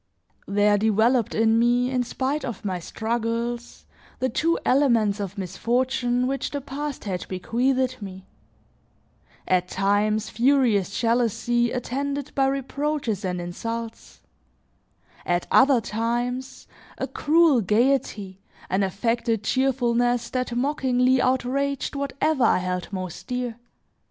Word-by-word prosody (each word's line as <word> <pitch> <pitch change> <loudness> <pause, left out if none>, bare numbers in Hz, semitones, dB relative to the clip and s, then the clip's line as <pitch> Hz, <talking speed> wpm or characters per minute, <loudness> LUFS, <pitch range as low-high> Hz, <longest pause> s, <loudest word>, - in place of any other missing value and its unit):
There 205 +1 +3
developed 220 +3 +2
in 225 0 +3
me, 245 +2 +2
in 255 -1 +1
spite 265 +4 -2
of 235 -6 -6
my 185 -2 -2
struggles, 230 +4 -3 0.3
the 260 0 0
two 330 +8 +1
elements 235 -7 +3
of 200 0 -5
misfortune 245 +6 0
which 270 +1 -2
the 285 - -3
past 285 +1 -5
had 185 -4 -4
bequeathed 255 +6 0
me: 190 -1 -8 1.2
at 180 -1 +2
times, 205 +3 0
furious 235 -6 +2
jealousy 240 0 +1
attended 275 +3 -3
by 270 -1 +2
reproaches 275 -5 -2
and 180 -1 -2
insults; 230 +6 -6 1.0
at 175 0 0
other 265 -2 +6
times, 240 +4 -3 0.3
a - - -2
cruel 310 -4 +3
gaiety, 210 -3 0 0.3
an 190 +2 +2
affected 225 +3 0
cheerfulness 245 -1 +1
that 255 -2 -2
mockingly 255 -1 +2
outraged 265 +3 0
whatever 280 0 0
I - - +4
held 180 0 -3
most 185 -3 -6
dear. 250 -2 -3
240 Hz, 115 wpm, -24 LUFS, 210-260 Hz, 1.2 s, other